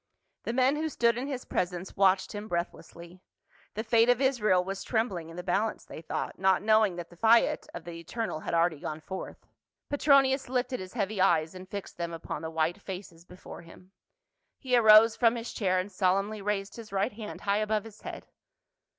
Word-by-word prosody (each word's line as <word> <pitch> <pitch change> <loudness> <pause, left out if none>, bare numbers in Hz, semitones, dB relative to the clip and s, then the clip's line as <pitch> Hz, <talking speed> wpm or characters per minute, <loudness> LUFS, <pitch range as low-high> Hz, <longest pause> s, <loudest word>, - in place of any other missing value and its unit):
The - - -1
men 260 +3 +3
who 315 +1 -1
stood 235 -5 +2
in 250 +3 -4
his 265 -3 -5
presence 180 +1 -3
watched 190 -1 +3
him 205 +1 -6
breathlessly; 170 0 -6 0.5
the 220 - -2
fate 230 +1 +3
of 245 -1 +4
Israel 215 -9 +2
was 195 +1 -5
trembling 200 -8 -2
in 165 - -10
the 180 - -6
balance, 200 +5 -1
they - - -9
thought, 165 - -4
not 190 0 +3
knowing 215 -3 +3
that 175 -1 -8
the - - -14
fiat 230 +5 +3
of - - -7
the 170 -1 -8
Eternal 215 +1 -4
had 165 - -3
already 165 -2 +2
gone 155 +1 -5
forth. 190 +4 -8 0.5
Petronius 275 -2 +3
lifted 250 0 -1
his 185 -1 -8
heavy 205 -3 -1
eyes 165 -3 +3
and 185 0 -11
fixed 200 -1 -7
them 170 -1 -4
upon 165 -2 -6
the 160 - -4
white 160 +4 -1
faces 180 -4 -9
before 180 -1 -11
him; 180 +2 -16 0.7
he 255 -3 0
arose 220 -1 +7
from 235 -1 +3
his 230 0 -6
chair 185 -4 +1
and 185 +2 -2
solemnly 195 +3 0
raised 200 +1 -3
his 225 -3 -10
right 200 +4 0
hand 210 0 -8
high 200 0 +1
above 215 -1 0
his 220 -1 -13
head. - - -8
200 Hz, 195 wpm, -29 LUFS, 180-230 Hz, 0.7 s, arose